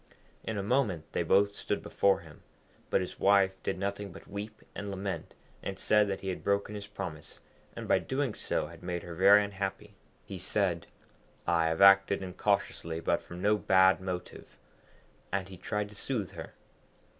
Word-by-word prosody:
In 110 Hz, -, -3 dB
a 100 Hz, -, -1 dB
moment 105 Hz, -, +1 dB
they -, -, 0 dB
both 100 Hz, +4 st, +3 dB
stood -, -, -3 dB
before 100 Hz, -1 st, +2 dB
him; 80 Hz, -3 st, -15 dB, 0.5 s
but -, -, +2 dB
his 90 Hz, -, -6 dB
wife 95 Hz, -1 st, +4 dB
did -, -, -2 dB
nothing 100 Hz, +1 st, -3 dB
but -, -, -13 dB
weep 105 Hz, +2 st, -7 dB
and 100 Hz, 0 st, -5 dB
lament, 95 Hz, 0 st, -4 dB, 0.3 s
and 95 Hz, -1 st, -5 dB
said 105 Hz, +1 st, +3 dB
that 95 Hz, -1 st, -3 dB
he 95 Hz, -, -3 dB
had 90 Hz, -, -4 dB
broken 100 Hz, +1 st, 0 dB
his 100 Hz, -1 st, -6 dB
promise, 90 Hz, -7 st, -7 dB, 0.4 s
and -, -, -6 dB
by -, -, +4 dB
so -, -, -11 dB
doing 130 Hz, -3 st, -1 dB
had 85 Hz, -3 st, -3 dB
made 90 Hz, -1 st, -3 dB
her 85 Hz, -, -7 dB
very 100 Hz, +4 st, +7 dB
unhappy. 100 Hz, +1 st, -4 dB, 0.3 s
He 95 Hz, -, -7 dB
said, 90 Hz, -2 st, 0 dB, 0.6 s
'I 85 Hz, -1 st, +3 dB
have 80 Hz, +3 st, -1 dB
acted 100 Hz, 0 st, +6 dB
incautiously, 90 Hz, -3 st, -1 dB
but -, -, +1 dB
from 90 Hz, +1 st, -9 dB
no 105 Hz, +1 st, +4 dB
bad 95 Hz, -1 st, +5 dB
motive,' 90 Hz, -1 st, -6 dB, 0.7 s
and 95 Hz, -1 st, -1 dB
he 95 Hz, -, -10 dB
tried 105 Hz, +3 st, -2 dB
to 105 Hz, -, -14 dB
soothe 105 Hz, -4 st, -3 dB
her. -, -, -9 dB
100 Hz, 180 wpm, -30 LUFS, 90-100 Hz, 0.7 s, very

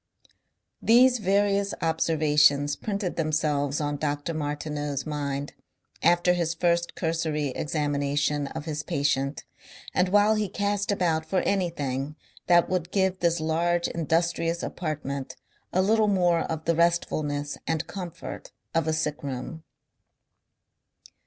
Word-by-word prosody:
These 245 Hz, +2 st, +5 dB
various 200 Hz, 0 st, +1 dB
observations 150 Hz, -3 st, +3 dB
printed 200 Hz, -4 st, -3 dB
themselves 150 Hz, -3 st, 0 dB
on 145 Hz, -1 st, -1 dB
Dr. 145 Hz, +2 st, -2 dB
Martineau's 145 Hz, -2 st, -3 dB
mind 145 Hz, -2 st, -3 dB, 0.5 s
after 175 Hz, +1 st, +4 dB
his 170 Hz, -1 st, -1 dB
first 170 Hz, 0 st, +1 dB
cursory 160 Hz, -3 st, -1 dB
examination 145 Hz, 0 st, -1 dB
of 160 Hz, +1 st, -6 dB
his 150 Hz, -2 st, -3 dB
patient 140 Hz, -1 st, -1 dB, 0.5 s
and 180 Hz, 0 st, +2 dB
while 205 Hz, +2 st, +5 dB
he 215 Hz, -2 st, -1 dB
cast 205 Hz, +1 st, -1 dB
about 170 Hz, -5 st, +1 dB
for 185 Hz, +3 st, 0 dB
anything 150 Hz, -7 st, -1 dB, 0.3 s
that 175 Hz, -1 st, +5 dB
would 180 Hz, -2 st, -1 dB
give 190 Hz, -1 st, +1 dB
this 170 Hz, -1 st, +2 dB
large 170 Hz, +2 st, +1 dB
industrious 165 Hz, +1 st, 0 dB
apartment 140 Hz, -5 st, -4 dB, 0.4 s
a 185 Hz, -, +2 dB
little 215 Hz, +2 st, +3 dB
more 175 Hz, -4 st, +3 dB
of 160 Hz, -1 st, -4 dB
the 170 Hz, -, +3 dB
restfulness 155 Hz, -4 st, 0 dB
and 160 Hz, -2 st, 0 dB
comfort 180 Hz, -4 st, -7 dB, 0.2 s
of 165 Hz, -1 st, +1 dB
a 160 Hz, -, +1 dB
sick 155 Hz, -1 st, -2 dB
room. 140 Hz, +4 st, -5 dB
160 Hz, 120 wpm, -26 LUFS, 145-180 Hz, 0.5 s, These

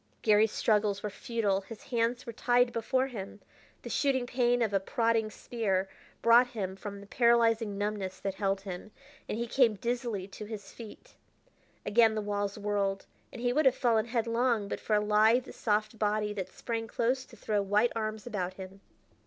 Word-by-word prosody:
Garry's 215 Hz, 0 st, +4 dB
struggles 210 Hz, -2 st, +1 dB
were 210 Hz, -, -3 dB
futile; 205 Hz, -2 st, -1 dB
his 215 Hz, +2 st, -11 dB
hands 240 Hz, +1 st, -1 dB
were 235 Hz, -, -6 dB
tied 245 Hz, +1 st, +2 dB
before 255 Hz, +3 st, +1 dB
him. 205 Hz, -6 st, -7 dB, 0.4 s
The -, -, -6 dB
shooting 265 Hz, -3 st, +1 dB
pain 245 Hz, -1 st, +2 dB
of 215 Hz, -3 st, -1 dB
a 195 Hz, -, +3 dB
prodding 225 Hz, +2 st, +1 dB
spear 200 Hz, -4 st, -2 dB, 0.4 s
brought 235 Hz, +2 st, +7 dB
him 195 Hz, -6 st, -4 dB
from 200 Hz, 0 st, -7 dB
the -, -, -11 dB
paralyzing 230 Hz, -2 st, +2 dB
numbness 205 Hz, -2 st, -3 dB
that 195 Hz, -, -2 dB
held 195 Hz, 0 st, -1 dB
him, 190 Hz, +1 st, -7 dB, 0.4 s
and -, -, -2 dB
he 235 Hz, -, -1 dB
came 235 Hz, -2 st, +3 dB
dizzily 235 Hz, -3 st, -3 dB
to 210 Hz, -, -8 dB
his 205 Hz, -2 st, -8 dB
feet. 225 Hz, -3 st, -12 dB, 0.7 s
Again 225 Hz, 0 st, +4 dB
the -, -, 0 dB
walls 205 Hz, 0 st, -2 dB
whirled, 200 Hz, -1 st, -1 dB, 0.3 s
and 240 Hz, -, -8 dB
he 245 Hz, 0 st, +2 dB
would 300 Hz, +1 st, +4 dB
have 260 Hz, -, +4 dB
fallen 230 Hz, -4 st, +2 dB
headlong 230 Hz, -2 st, 0 dB
but -, -, -4 dB
for 215 Hz, -, 0 dB
a -, -, +4 dB
lithe, 220 Hz, +4 st, +3 dB
soft 215 Hz, 0 st, -1 dB
body 210 Hz, 0 st, 0 dB
that 190 Hz, -3 st, -4 dB
sprang 225 Hz, +3 st, -4 dB
close 250 Hz, +4 st, 0 dB
to -, -, -16 dB
throw 210 Hz, -1 st, 0 dB
white 210 Hz, +4 st, +2 dB
arms 215 Hz, -1 st, -3 dB
about 185 Hz, -6 st, -3 dB
him. 190 Hz, +1 st, -10 dB
215 Hz, 180 wpm, -30 LUFS, 205-235 Hz, 0.7 s, brought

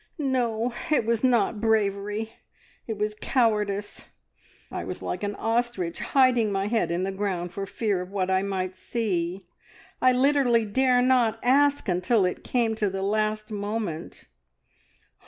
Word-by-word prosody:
"No, 245 Hz, -5 st, 0 dB, 0.2 s
it 300 Hz, -7 st, +2 dB
was 230 Hz, 0 st, 0 dB
not 230 Hz, -4 st, +2 dB
bravery, 210 Hz, 0 st, 0 dB, 0.5 s
it 220 Hz, -2 st, -3 dB
was 210 Hz, +1 st, -1 dB
cowardice! 210 Hz, -5 st, 0 dB, 0.7 s
I -, -, -4 dB
was -, -, -6 dB
like -, -, -3 dB
an 205 Hz, 0 st, -3 dB
ostrich 225 Hz, -7 st, -1 dB
hiding 250 Hz, -6 st, +3 dB
my 195 Hz, 0 st, 0 dB
head 225 Hz, +2 st, 0 dB
in 170 Hz, +2 st, -1 dB
the 195 Hz, -, -1 dB
ground 190 Hz, -3 st, -3 dB
for 195 Hz, -1 st, -4 dB
fear 205 Hz, -3 st, -1 dB
of 180 Hz, -, -7 dB
what 190 Hz, -1 st, -1 dB
I 190 Hz, 0 st, +3 dB
might 190 Hz, -2 st, -3 dB
see. 185 Hz, -3 st, -2 dB, 0.6 s
I 255 Hz, -, +6 dB
literally 255 Hz, -3 st, +3 dB
dare 250 Hz, +3 st, +3 dB
not 245 Hz, -4 st, +3 dB
ask 285 Hz, +1 st, +3 dB
until 185 Hz, +3 st, +2 dB
it 180 Hz, -, -3 dB
came 235 Hz, -3 st, +1 dB
to 210 Hz, -2 st, +1 dB
the 190 Hz, 0 st, -4 dB
last 215 Hz, +1 st, -1 dB
moment. 205 Hz, -5 st, -4 dB
215 Hz, 150 wpm, -26 LUFS, 195-240 Hz, 0.7 s, I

